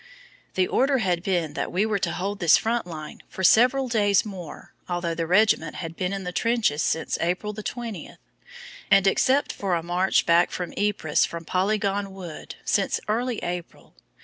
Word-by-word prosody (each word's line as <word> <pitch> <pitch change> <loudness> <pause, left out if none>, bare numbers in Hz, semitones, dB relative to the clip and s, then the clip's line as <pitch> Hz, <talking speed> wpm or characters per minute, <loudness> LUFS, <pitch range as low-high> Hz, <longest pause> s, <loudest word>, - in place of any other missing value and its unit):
The 185 - +3
order 270 +1 +2
had 180 -7 0
been 175 -5 -1
that - - -3
we 190 +4 +1
were 210 -2 0
to 195 - -1
hold 200 +2 -3
this 170 -3 +6
front 230 -3 -1 0.4
for 190 - -6
several 255 +7 +5
days 205 -4 +2
more 185 -7 -9 0.2
although 175 -1 -1
the 165 0 -3
regiment 185 -4 +3
had 165 -1 -6
been 180 +1 -2
in 195 -1 -4
the 180 - -4
trenches 225 -8 +1
since 160 - -1
April 180 +5 -1
the 215 - -7
20th, 230 -2 -6 0.7
and, 195 -1 +5
except 260 +8 +2
for 190 -3 -1
a 165 - -2
march 180 +2 +1
back 170 +1 +4
to 180 -1 -4
Ypres 200 -7 +1
from 170 -1 -7
Polygon 200 +1 -1
Wood, 175 -5 -8
since 200 - +1
early 235 +2 -1
April. 175 -1 -6
195 Hz, 175 wpm, -25 LUFS, 175-215 Hz, 0.7 s, this